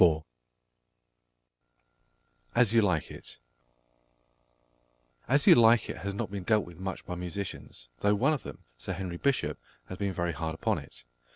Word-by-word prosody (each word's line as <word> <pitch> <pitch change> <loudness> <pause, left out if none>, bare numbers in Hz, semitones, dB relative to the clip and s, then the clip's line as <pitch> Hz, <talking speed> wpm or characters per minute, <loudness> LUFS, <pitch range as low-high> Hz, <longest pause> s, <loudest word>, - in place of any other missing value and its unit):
AS 120 -3 +4
YOU 115 - +6
LIKE 90 -7 0
IT - - -10 1.9
As 140 +2 +3
You - - +10
Like 115 0 +5
It - - -8
has 100 +2 -4
not 100 - -3
been 100 -1 -4
dealt 105 +2 +2
with 85 -1 -13
much 95 0 -5
by - - -5
musicians, 90 -8 -6
though 105 0 +3
one 135 +9 +3
of 150 - -2
them, - - -10 0.2
Sir 95 - -4
Henry 90 -2 -5
Bishop, 140 +7 0 0.3
has 95 - -7
been 100 -1 0
very 85 -1 -1
hard 80 0 -4
upon - - 0
it. - - -13
95 Hz, 155 wpm, -29 LUFS, 85-110 Hz, 1.9 s, You